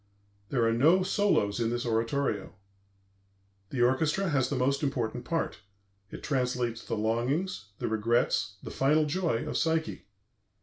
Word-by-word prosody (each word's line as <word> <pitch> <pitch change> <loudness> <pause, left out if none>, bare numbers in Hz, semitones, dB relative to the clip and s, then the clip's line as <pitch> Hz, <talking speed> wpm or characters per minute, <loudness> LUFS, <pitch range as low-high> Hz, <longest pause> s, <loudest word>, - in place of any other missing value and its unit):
There 120 -3 +1
are 115 - +2
no 160 +10 +4
solos 185 - +1
in 115 -1 +1
this 120 +1 -2
oratorio. 115 +4 -1 1.1
The 125 -3 0
orchestra 150 +9 +2
has 135 -4 +1
the 145 - -1
most 135 +2 +1
important 125 -5 -2
part; 165 -7 -2 0.5
it - - -9
translates 125 -4 -1
the 115 - -3
longings, 120 - -1
the - - -3
regrets, 110 +2 +1
the - - -7
final 150 +3 +3
joy 150 -6 -1
of - - -2
Psyche.... 160 -6 -1
130 Hz, 140 wpm, -29 LUFS, 115-155 Hz, 1.1 s, no